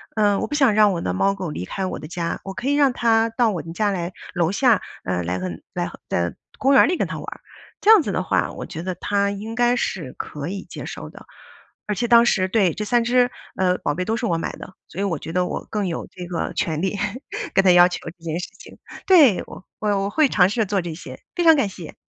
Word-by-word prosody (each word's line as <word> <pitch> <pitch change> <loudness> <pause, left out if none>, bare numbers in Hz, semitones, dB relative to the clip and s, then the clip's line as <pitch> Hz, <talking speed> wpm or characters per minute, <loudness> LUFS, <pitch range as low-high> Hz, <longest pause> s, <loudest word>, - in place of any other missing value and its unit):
嗯， 205 -2 +3
我 - - -2
不 - - -7
想 270 -7 +4
让 210 -1 +5
我 170 - -3
的 90 - -2
猫 195 - +2
狗 190 -3 -5
离 90 - -5
开 190 - -3
我 185 - -3
的 150 - -8
家， 170 0 -3
我 195 - -6
可 245 - -5
以 285 - +3
让 285 -2 +4
他 225 -1 +2
到 230 0 +2
我 175 -5 -3
们 165 - -9
家 210 +3 +1
来 175 -2 -3 0.2
楼 175 -1 +1
下， 230 0 +3 0.2
呃， 90 -1 -1
来 90 +2 -2
来 90 0 -3 0.2
来 - - -2 0.2
在 85 0 -1 0.2
公 275 +1 +3
园 270 - +7
里 360 - 0
跟 - - 0
它 - - -5
玩 - - -7
儿。 - - -8 0.4
这 420 - +1
样 435 -4 +8
子 - - -3
的 - - -1
话， - - 0
我 - - -7
觉 160 - -7
得 185 0 -2
他 200 +2 0
应 215 +3 -6
该 240 0 +3
是 165 - -3
可 145 0 -6
以 195 +1 -5
接 - - -8
受 - - -7
的， - - -14 0.6
而 210 - -1
且 240 +4 -1
当 235 0 +7
时 185 -5 +2
对， 190 -4 +2
这 210 - -4
3 240 +2 +2
只， 245 +1 +3 0.2
呃， 185 -1 +1
宝 145 - -1
贝 180 - -2
都 220 - 0
是 235 - -2
我 170 - +1
买 165 - -3
的， 185 - -11
所 190 - -6
以 - - 0
我 185 -5 -1
觉 160 +3 -8
得 180 0 +1
我 - - -5
更 210 -3 -1
有 170 - -4
这 180 -1 -8
个 175 -1 -3
权 155 -2 -1
利 190 +2 -1 0.6
跟 195 - +5
他 185 - +7
要 175 0 +7
求 180 - -4
这 170 0 -27
件 165 0 -3
事 180 - -6
情， - - -13 0.3
对， 300 - +6
我 - - -11
我 215 - -2 0.2
我 200 - -1
会 305 +1 +3
尝 180 -6 +4
试 210 - -4
着 225 - +2
做 200 0 0
这 170 -2 -5
些。 170 - -10 0.2
非 350 - 0
常 325 -1 +7
感 275 -7 +1
谢。 175 -4 -10
195 Hz, 285 characters per minute, -22 LUFS, 175-230 Hz, 0.6 s, 样